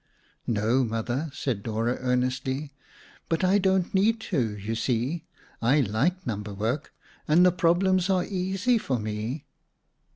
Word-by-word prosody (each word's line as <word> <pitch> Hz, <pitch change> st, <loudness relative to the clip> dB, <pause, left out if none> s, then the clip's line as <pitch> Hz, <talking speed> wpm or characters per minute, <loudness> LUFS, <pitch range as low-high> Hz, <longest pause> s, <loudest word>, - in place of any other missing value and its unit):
"No, 115 Hz, +4 st, +2 dB
Mother," 120 Hz, +6 st, -2 dB
said 130 Hz, -6 st, -2 dB
Dora 115 Hz, +3 st, -1 dB
earnestly. 130 Hz, +3 st, -1 dB, 0.6 s
"But 165 Hz, +2 st, 0 dB
I 190 Hz, +2 st, +4 dB
don't 190 Hz, -2 st, +1 dB
need 215 Hz, +4 st, +3 dB
to, 120 Hz, -, -1 dB
you 105 Hz, +3 st, -4 dB
see. 130 Hz, +8 st, -1 dB, 0.4 s
I 135 Hz, +6 st, +4 dB
like 140 Hz, -, 0 dB
number 105 Hz, -2 st, -4 dB
work 115 Hz, +9 st, -2 dB, 0.4 s
and 170 Hz, +4 st, +6 dB
the 180 Hz, -, +6 dB
problems 180 Hz, +2 st, +2 dB
are 185 Hz, -2 st, +2 dB
easy 195 Hz, +5 st, 0 dB
for 130 Hz, -10 st, -1 dB
me." 110 Hz, +6 st, -4 dB
135 Hz, 135 wpm, -26 LUFS, 115-180 Hz, 0.6 s, and